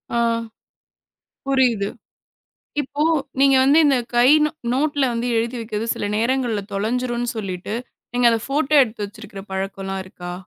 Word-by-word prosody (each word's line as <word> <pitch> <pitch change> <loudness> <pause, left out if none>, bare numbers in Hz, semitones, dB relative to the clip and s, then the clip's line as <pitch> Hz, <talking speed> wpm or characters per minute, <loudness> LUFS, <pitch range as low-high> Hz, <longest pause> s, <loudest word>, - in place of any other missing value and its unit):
ஆ. - - +2 1.3
புரியுது. 250 -7 +2 0.9
இப்போ 290 +1 -3 0.4
நீங்க 275 0 +6
வந்து 280 +4 +5
இந்தக் 250 -5 +2
கை 240 +1 +6 0.2
ந 300 - +2 0.2
நோட்ல 285 +1 0
வந்து 235 +1 -2
எழுதி 230 +2 -1
வைக்குது 220 0 -4
சில 205 - -3
நேரங்கள்ல 235 -2 0
தொலைஞ்சுடுனு 240 +4 -1
சொல்லிட்டு, 195 0 -4 0.4
நீங்க 245 0 +3
அத 230 - +2
ஃபோட்டோ 295 +2 0
எடுத்து 220 -4 -3
வச்சிருக்கிற 200 -1 -10
பழக்கம் 195 0 -4
எல்லாம் 195 0 -3
இருக்கா? 175 -1 -8
235 Hz, 140 wpm, -21 LUFS, 205-265 Hz, 1.3 s, நீங்க